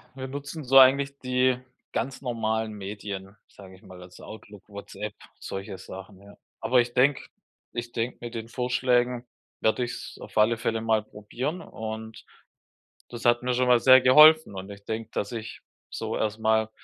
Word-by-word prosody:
Wir 130 0 -6
nutzen 145 +3 -7
so 135 +1 +4
eigentlich 140 +1 +5
die 125 0 +1 0.3
ganz 130 +3 -3
normalen 110 -3 -2
Medien, 100 -1 -7
sage 95 -2 -14
ich 95 - -20
mal, 90 -1 -13
also 90 0 -14
Outlook, 105 -2 -12
WhatsApp, 100 0 -7 0.3
solche 95 0 -6
Sachen, 95 0 -11
ja. 100 0 -15 0.3
Aber 125 -1 +4
ich 120 0 -5
denke 135 +2 +3 0.5
ich 120 0 -5
denke, 115 +1 -3
mit 120 0 -8
den 115 -1 -5
Vorschlägen 125 0 0 0.3
werde 110 +3 +1
ich's 120 0 -6
auf - - -12
alle 110 +2 +4
Fälle 115 0 -2
mal 110 -1 +1
probieren 125 - -5
und 110 0 -8 0.8
das 120 -1 -8
hat 120 0 +3
mir 125 0 0
schon 125 +1 +1
mal 125 -1 +5
sehr 130 0 +8
geholfen. 150 -1 +7
Und 95 +1 -7
ich 100 0 -12
denke, 110 0 -4
dass 100 - -3
ich 115 -1 -7 0.3
so - - -4
erstmal 110 0 +1
115 Hz, 165 wpm, -26 LUFS, 105-125 Hz, 0.8 s, sehr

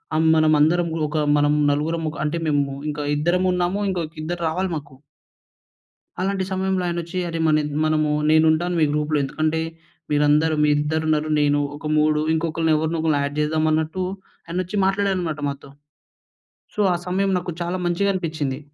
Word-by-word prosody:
ఆహ్, 160 +1 +3
మనమందరం 155 +2 +3 0.2
ఒక 155 - -3 0.2
మనం 145 0 +3 0.2
నలుగురం 160 +3 -1
ఒక - - -10
అంటే 150 +3 -1
మేము 145 -1 +2 0.3
ఇంకా 150 0 -4
ఇద్దరం 175 +4 +1
ఉన్నాము, 180 +3 0
ఇంకో 180 -3 -1 0.2
ఇద్దరు 175 +2 -4
రావాలి 185 +3 -1
మాకు. 140 -2 -11 1.3
అలాంటి 190 0 -1
సమయంలో 190 0 0
ఆయనొచ్చి 170 +1 -3
"అరె! 165 - -3
మన 155 0 +4 0.3
మనము 155 -1 +1 0.2
నేను 155 0 +5
ఉంటాను 175 +2 -1
మీ - - +5
గ్రూప్‌లో. 150 0 0
ఎందుకంటే, 155 +3 -1 0.5
మీరందరు 150 +2 +3
మీ 150 - +3
ఇద్దరున్నారు 155 +1 0
నేను 145 0 +2 0.2
ఒక 150 - -9
మూడు 150 0 +2
ఇంకొకళ్ళని 160 0 0
ఎవరినో 160 +2 -1
ఒకరిని 155 -3 +2
యాడ్ 145 +1 -4
చేద్దామన్నట్టు" 155 +3 0 0.4
ఆయనొచ్చి 185 +4 -3
మాట్లాడారన్నమాట 190 -6 -1
మాతో. 140 0 -7 1.1
సో, - - -7
ఆ - - +1
సమయం 195 +2 0
నాకు 175 0 -5
చాలా 175 +2 -2
మంచిగా 200 +3 +1
అనిపించింది. 155 -7 -3
160 Hz, 150 wpm, -22 LUFS, 150-175 Hz, 1.3 s, నేను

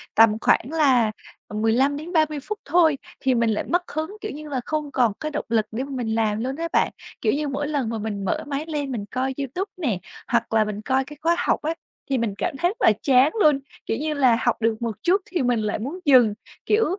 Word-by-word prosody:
tầm 225 -1 +6
khoảng 260 - +2
là, 265 -9 +3 0.4
ừm, 210 0 -4
15 260 +6 +2
đến 315 +4 -7
30 310 -3 +2
phút 420 +9 -5
thôi 320 -1 +4 0.2
thì 260 -1 +2
mình 230 -1 +2
lại 215 - 0
mất 350 +1 -1
hứng, 315 +7 -4
kiểu 425 - -4
như 300 +1 -8
là 265 -3 -2
không 305 -2 -2
còn 245 -6 +2
cái 310 - -3
động 300 - -3
lực 220 -2 +2
để 230 +4 -2
mà 275 - -8
mình 240 -4 -2
làm 215 -2 +1
luôn 265 +2 -2
á 335 +1 -3
bạn. - - +3 0.3
Kiểu 215 - +2
như 295 +1 -1
mỗi 285 +1 -2
lần 285 -6 -1
mà 225 - -2
mình 205 -2 -4
mở 185 - -1
máy 290 +1 -3
lên 290 -4 -3
mình 220 -5 -3
coi 260 +4 -2
YouTube 325 - -3
nè, 250 - -1 0.3
hoặc - - 0
là 220 -1 +5
mình 210 0 -4
coi 260 +4 +1
cái 295 +2 -11
khóa 335 +2 +3
học - - +1
á, 315 +2 -1 0.4
thì 270 - +1
mình 230 -4 -1
cảm 330 -6 -2
thấy 350 +5 +2
rất 430 - -7
là - - +6
chán 265 +2 +5
luôn. 300 -5 +5 0.3
Kiểu 225 - -1
như 305 +2 -2
là, 260 -5 +4
học 240 - +2
được 225 0 0
một 230 -2 -2
chút 380 +4 +3
thì 365 -6 -2
mình 245 -2 +2
lại 210 -1 -1
muốn 280 +11 -5
dừng. 250 -7 +6 0.3
Kiểu, 425 +2 +3
270 Hz, 250 wpm, -23 LUFS, 225-305 Hz, 0.4 s, tầm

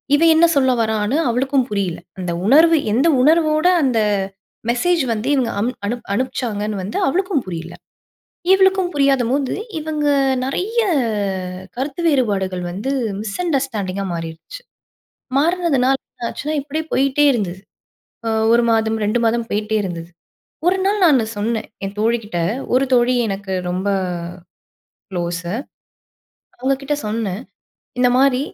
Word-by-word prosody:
இவன் 330 +2 +5
என்ன 335 +1 +6
சொல்ல 260 -2 +4
வரான்னு 220 +4 0
அவளுக்கும் 260 +1 +1
புரியல. 195 -5 -2 0.2
அந்த 180 -2 -3 0.2
உணர்வு 320 +5 +6 0.2
எந்த 270 +8 +3
உணர்வோட 310 +2 +3 0.2
அந்த 245 -4 +2 0.7
மெசேஜ் 335 +6 +2
வந்து 220 +3 -4
இவங்க 245 -4 0
அம் 230 +4 +1 0.2
அனு 235 +4 -1 0.2
அனுப்பிச்சாங்கன்னு 215 -3 -2
வந்து 205 - -4
அவளுக்கும் 360 - 0
புரியல. 170 -1 -6 0.8
இவளுக்கும் 380 -1 +3
புரியாதம்போது 270 -1 +2 0.2
இவங்க 305 -1 -2 0.4
நிறைய 405 - -1 1.0
கருத்து 275 +5 -3
வேறுபாடுகள் 200 - +1
வந்து 205 +9 -4 0.3
மிஸ் 215 -2 -5
அண்டர்ஸ்டாண்டிங்கா 220 - -1
மாறிருச்சு. 165 - -7 0.8
மாறனதுனால 295 -5 +2
என்ன 240 - -8
ஆச்சுன்னா, 305 +1 -4
இப்படியே 305 +3 -4
போயிட்டே 275 +2 +2
இருந்தது. 190 -6 -2 0.7
அ 225 - +1 0.2
1 235 0 +5
மாதம் 220 0 +1
2 215 +4 +1
மாதம் 230 0 0
போயிட்டே 215 +1 -1
இருந்தது. 170 -2 -5 0.6
ஒரு 365 - +4
நாள் 410 +1 +1
நானு 270 -9 +5
சொன்னேன், 220 +2 -2 0.2
என் 195 +1 -5
தோழி 230 +2 +2
கிட்ட 205 -4 -4 0.4
ஒரு 265 +2 +4
தோழி 245 +1 +3
எனக்கு 195 -1 -4 0.2
ரொம்ப 185 +3 -2 1.2
குளோசு. 175 0 -3 1.1
அவங்க 265 +2 +1
கிட்ட 295 +2 -1
சொன்னேன். 215 -1 -2 0.6
இந்த 250 0 +4
மாரி 265 -1 +4
245 Hz, 125 wpm, -19 LUFS, 205-290 Hz, 1.2 s, என்ன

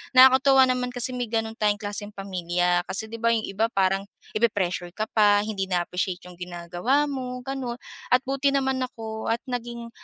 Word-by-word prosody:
Nakakatuwa 265 +1 +7
naman 250 0 0
kasi 245 +1 -1
may 245 -1 -2
gano'n 225 0 -1
tayong 210 -1 +2
klaseng 205 0 -5
pamilya 180 -2 0
kasi 220 +3 -3
di 230 - -5
ba 230 - +1
yung 225 -1 0
iba 205 +3 0
parang 195 0 +1 0.3
ipi-pressure 200 -6 0
ka 215 - -1
pa 205 -2 +5
hindi 205 -3 -3
na-appreciate 180 0 -2
yung 180 - -13
ginagawa 180 +10 0
mo 250 -2 -4
gano'n. 260 -2 -4 0.4
At 255 - +4
buti 275 +1 +1
naman 265 -1 +1
ako 220 -2 -7
at 230 - 0
naging, 235 -1 -5
220 Hz, 175 wpm, -25 LUFS, 195-250 Hz, 0.4 s, Nakakatuwa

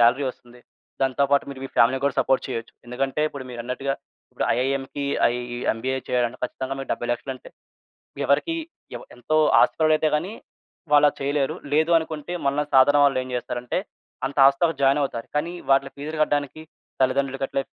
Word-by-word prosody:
Salary 120 +4 +4
వస్తుంది. 125 -1 -12 0.4
దాంతో 135 +1 +2
పాటు 140 - +3
మీరు 135 -1 -9
మీ - - -5
ఫ్యామిలీ‌ని 125 +5 +4
కూడా 140 - +1
సపోర్ట్ 135 - +1
చేయొచ్చు". 115 -3 -5
ఎందుకంటే 135 +4 -2
ఇప్పుడు 140 -3 -8
మీరన్నట్టుగా 125 +3 -3 0.4
ఇప్పుడు - - -2
ఐఐఎం‌కి 135 +2 -2 0.5
ఈ - - -4 0.2
ఎంబీఏ 130 +4 -2
చేయాలంటే 125 -1 0
ఖచ్చితంగా 130 +2 -4
మీకు 135 - -7
70,00,000 120 +2 -3
అంటే 130 - -14 0.8
ఎవరికీ 235 - +2 0.4
ఎవ - - -9
ఎంతో 155 +6 -1 0.2
ఆస్తిపరులైతే 155 -1 +3
గాని 175 +7 -4 0.6
వాళ్లది 145 0 +5
చేయలేరు. 140 0 0 0.2
లేదు 160 +2 +3
అనుకుంటే 160 0 -6
మనలా 140 +2 +1
సాధారణ 145 +2 +6
వాళ్ళు 135 -2 +3
ఏం 130 - -9
చేస్తారంటే 120 +2 -3 0.5
అంత 140 - -6
హాస్టల్‌లో 140 +4 +2
జాయిన్ 135 +2 +4
అవుతారు. 115 -4 -3
కానీ 165 +4 -1 0.2
వాటి 135 0 +3
ఫీస్‌లు 155 +3 -6
కట్టడానికి 145 +1 -1 0.4
తల్లిదండ్రులు 135 +1 0
గట్ల 135 - -1
135 Hz, 155 wpm, -24 LUFS, 130-145 Hz, 0.8 s, సాధారణ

